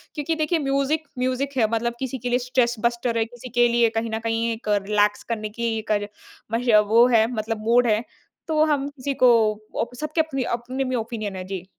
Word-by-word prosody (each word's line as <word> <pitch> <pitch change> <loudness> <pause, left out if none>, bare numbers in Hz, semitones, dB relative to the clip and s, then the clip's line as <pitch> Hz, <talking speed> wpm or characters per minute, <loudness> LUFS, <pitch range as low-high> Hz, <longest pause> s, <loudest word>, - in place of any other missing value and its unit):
क्योंकि 310 +2 -1
देखिए 315 +2 0
music, 280 +2 0
music 260 +2 -1
है 225 -3 +4
मतलब 230 +1 0
किसी 265 0 -3
के 245 0 -4
लिए 245 +1 +2
स्ट्रेस 245 -1 +1
बस्टर 235 0 0
है, 225 - +2
किसी 245 +2 -11
के 240 - +6
लिए 235 -1 +3
कहीं 225 0 -1
ना 220 0 -2
कहीं 230 +1 0
एक 225 0 -10 0.2
रिलैक्स 210 0 +2
करने 215 -1 -4
की 230 -1 -1
कर 205 -1 +1 0.5
मश 240 +2 0 0.2
वो 230 +3 +6
है 220 -1 +5
मतलब 215 -1 -3
मूड 240 +1 +4
है। 215 +1 +2 0.4
तो 310 -1 +3
हम 285 -3 0
किसी 280 -1 -4
को 250 - +8 0.5
ओप 240 +1 -4
सबके 305 +4 0
अपने-अपने 260 -3 -3
में 255 -1 -2
ओपिनियन 220 -4 -4
हैं। 185 -1 -6
जी। 190 -2 -5
240 Hz, 205 wpm, -23 LUFS, 225-270 Hz, 0.5 s, को